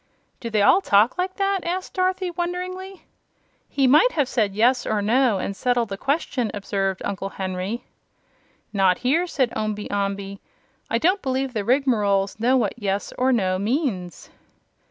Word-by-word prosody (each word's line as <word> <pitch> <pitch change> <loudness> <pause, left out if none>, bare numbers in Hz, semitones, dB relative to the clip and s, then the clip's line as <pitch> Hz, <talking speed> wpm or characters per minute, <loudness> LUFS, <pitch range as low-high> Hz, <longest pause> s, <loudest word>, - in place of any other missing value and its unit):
"Do 235 - -5
they 215 -2 +2
all 370 - +5
talk 215 - +3
like 370 +1 -1
that?" 395 -1 0
asked 365 +2 -3
Dorothy, 370 -1 0
wonderingly. 365 +2 -5 0.6
"He 275 - +1
might 305 - +5
have 290 -5 +1
said 210 -6 0
'yes' 245 +4 +2
or 215 - 0
'no' 230 +1 +2
and 195 +1 -3
settled 245 0 0
the 195 - -3
question," 270 -5 -1
observed 195 -1 -2
Uncle 195 -1 -3
Henry. 190 +4 -4 0.9
"Not 190 -3 +3
here," 325 +8 +2
said 260 -7 0
Omby 210 -1 -3
Amby. 200 -1 -3 0.5
"I 230 - +1
don't 370 - +2
believe 265 -1 -2
the 215 -3 -2
Rigmaroles 210 -6 +1
know 250 +4 +3
what 245 - 0
'yes' 200 -3 -2
or 255 +1 +3
'no' 185 -6 +1
means." 205 - -2
235 Hz, 155 wpm, -23 LUFS, 200-300 Hz, 0.9 s, all